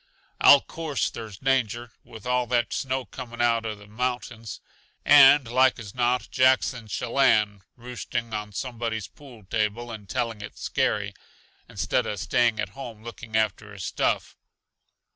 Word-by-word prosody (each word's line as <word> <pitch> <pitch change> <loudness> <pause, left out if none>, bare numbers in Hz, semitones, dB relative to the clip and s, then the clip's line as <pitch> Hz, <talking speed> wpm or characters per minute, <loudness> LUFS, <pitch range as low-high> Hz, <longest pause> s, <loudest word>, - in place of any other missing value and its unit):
"I'll 140 - +8
course 160 -5 -3
there's 110 -4 -8
danger, 120 -2 0
with 110 -1 -12
all 125 0 +1
that 120 0 0
snow 130 -1 -2
coming 120 -3 -9
out 115 -1 +2
uh 110 - -4
the 105 0 -15
mountains. 115 0 -4 0.5
And 145 -2 +8
like 130 +2 +3
as 105 -4 -9
not 125 0 +1
Jack's 130 +1 +3
in 115 -3 -10
Shellanne 110 -3 +2
roosting 120 -1 -5
on 105 0 -4
somebody's 115 -2 -4
pool 125 -7 -15
table 110 +4 -2
and 105 -4 -9
telling 115 -3 -2
it 105 - -9
scary, - - -1 0.6
instead - - -1
uh 105 - -3
staying 115 +4 +1
at 105 -2 -2
home 110 0 -9
looking 115 -1 -5
after 110 -1 -1
his 100 -2 -8
stuff. - - -1
115 Hz, 150 wpm, -25 LUFS, 110-125 Hz, 0.6 s, I'll